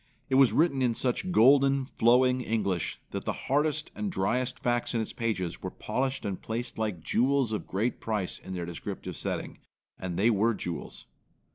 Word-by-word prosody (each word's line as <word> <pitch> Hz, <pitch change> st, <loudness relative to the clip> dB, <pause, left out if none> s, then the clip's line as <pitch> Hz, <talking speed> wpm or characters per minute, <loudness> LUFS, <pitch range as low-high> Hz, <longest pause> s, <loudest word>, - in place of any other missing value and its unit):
It -, -, -2 dB
was 135 Hz, -, +6 dB
written 150 Hz, -4 st, +2 dB
in 120 Hz, -3 st, +2 dB
such 130 Hz, +10 st, -1 dB
golden, 135 Hz, 0 st, +5 dB
flowing 125 Hz, +1 st, +3 dB
English 100 Hz, -7 st, -1 dB
that -, -, -4 dB
the -, -, -1 dB
hardest 150 Hz, +2 st, +1 dB
and 210 Hz, -2 st, -3 dB
driest 125 Hz, -, 0 dB
facts 120 Hz, 0 st, 0 dB
in -, -, +2 dB
its 110 Hz, -, -5 dB
pages 105 Hz, -7 st, -2 dB
were -, -, -3 dB
polished 130 Hz, -2 st, -2 dB
and 100 Hz, -2 st, -3 dB
placed 115 Hz, +1 st, -4 dB
like 105 Hz, -7 st, -2 dB
jewels 130 Hz, +1 st, +2 dB
of 105 Hz, -, -3 dB
great 110 Hz, +6 st, -1 dB
price 105 Hz, -5 st, -2 dB
in 95 Hz, -, -7 dB
their 90 Hz, -1 st, -3 dB
descriptive 85 Hz, -1 st, -6 dB
setting. -, -, -4 dB, 0.4 s
And 90 Hz, -2 st, -4 dB
they 110 Hz, +5 st, +4 dB
were 110 Hz, +2 st, +2 dB
jewels. 85 Hz, -5 st, -6 dB
115 Hz, 175 wpm, -29 LUFS, 100-130 Hz, 0.4 s, was